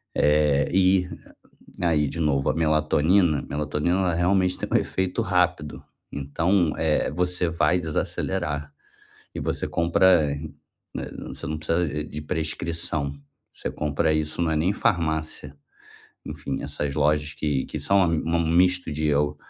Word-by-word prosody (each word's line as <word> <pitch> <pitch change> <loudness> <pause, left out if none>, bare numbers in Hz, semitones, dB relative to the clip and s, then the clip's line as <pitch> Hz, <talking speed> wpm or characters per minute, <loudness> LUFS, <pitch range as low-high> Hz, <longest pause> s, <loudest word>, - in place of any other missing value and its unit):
eh, 75 -1 +3
e 95 0 +3 0.8
aí 80 -4 +2
de 85 - -5
novo, 70 -4 +1
a - - 0
melatonina, 80 +1 +2
melatonina 75 +4 -1
ela 90 -3 +1
realmente 90 +2 +2
tem - - -4
um - - +5
efeito 95 -1 -2
rápido, 90 -4 0 0.3
então, 80 +5 +1
é, 80 -2 +1
você 90 -1 0
vai 85 +1 +2
desacelerar. 75 -2 -2 0.6
E - - -3
você - - -2
compra, 85 -1 +3 0.7
né, - - -5 0.2
você - - -8
não 80 0 -3
precisa 80 -1 -1
de 75 0 -7
prescrição, 80 -1 -3 0.4
você - - -5
compra 75 +1 0
isso 75 +2 -1
não 85 -2 +1
é - - +1
nem 85 +4 +2
em - - -3
farmácia, 80 -8 -1 0.7
enfim, 70 - -5
essas 70 -1 -3
lojas 75 0 +1
que 75 -4 -1
que - - -5
são 100 - +2
um 80 0 0
misto 90 -1 +2
de 75 +1 -1
eu 75 0 +1
80 Hz, 140 wpm, -24 LUFS, 75-90 Hz, 0.8 s, um